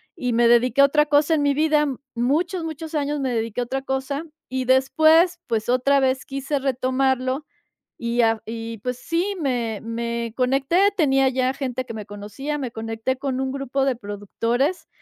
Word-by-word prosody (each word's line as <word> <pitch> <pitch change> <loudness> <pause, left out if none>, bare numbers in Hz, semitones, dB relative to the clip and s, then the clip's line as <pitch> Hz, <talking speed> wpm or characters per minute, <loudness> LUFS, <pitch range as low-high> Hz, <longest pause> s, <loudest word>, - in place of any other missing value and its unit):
y 250 -7 -2
me 235 0 +4
dediqué 245 +3 +4
a - - +9
otra 300 +1 +3
cosa 295 +2 +3
en 300 - +2
mi 285 -1 +2
vida. 300 -1 +3 0.3
Muchos, 315 +9 0
muchos 320 0 -6
años 295 0 -1
me 260 -2 -1
dediqué 225 +1 -2
a - - +1
otra 270 +2 -3
cosa 270 +3 -3 0.3
y 260 0 -2
después, 315 +7 +4
pues 225 -1 -1
otra 275 +3 +3
vez 260 0 0
quise 275 +1 -2
retomarlo, 260 +1 0 0.5
y 235 0 0
a 225 0 +4
v - - -18
y 225 0 -6
pues 250 +3 -4
sí, 370 +4 -1
me 240 -6 -1
me 235 0 -3
conecté, 270 +6 +1 0.2
tenía 270 -5 +3
ya 260 0 +1
gente 255 -2 -3
que 230 -3 -8
me 210 -2 -7
conocía, 210 +9 -5
me 255 -4 -4
conecté 225 +3 -3
con 265 -2 -2
un 265 0 -2
grupo 275 0 -1
de 265 -2 +1
productores 230 - -2
260 Hz, 185 wpm, -23 LUFS, 235-285 Hz, 0.5 s, a